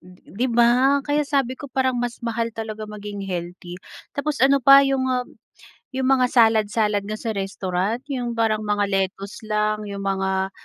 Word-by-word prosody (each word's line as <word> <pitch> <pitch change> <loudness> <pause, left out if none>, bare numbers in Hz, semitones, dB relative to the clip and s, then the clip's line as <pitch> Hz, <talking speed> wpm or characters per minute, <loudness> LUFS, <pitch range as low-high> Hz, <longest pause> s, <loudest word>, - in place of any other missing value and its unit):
'Di 185 +6 -6
ba? 245 +4 +4
Kaya 295 0 +1
sabi 275 -3 0
ko 285 - -8
parang 260 0 0
mas 240 -1 -3
mahal 230 0 -1
talaga 220 -1 -6
maging 205 -1 -7
healthy, 175 -1 -6 0.4
tapos 290 +1 -2
ano 275 +1 +5
pa, 275 +2 +9
yung 270 -1 0
ah, 250 -1 -1 0.7
yung 260 0 -1
mga 260 -2 +4
salad-salad 220 -3 +3
nga 215 +1 -4
sa 225 +1 -3
restaurant 195 +2 -2
yung 240 -3 -3
parang 220 -2 +1
mga 210 -1 0
lettuce 195 +2 -2
lang, 215 0 -1
yung 200 0 -6
mga 190 0 -1
220 Hz, 165 wpm, -22 LUFS, 200-255 Hz, 0.7 s, pa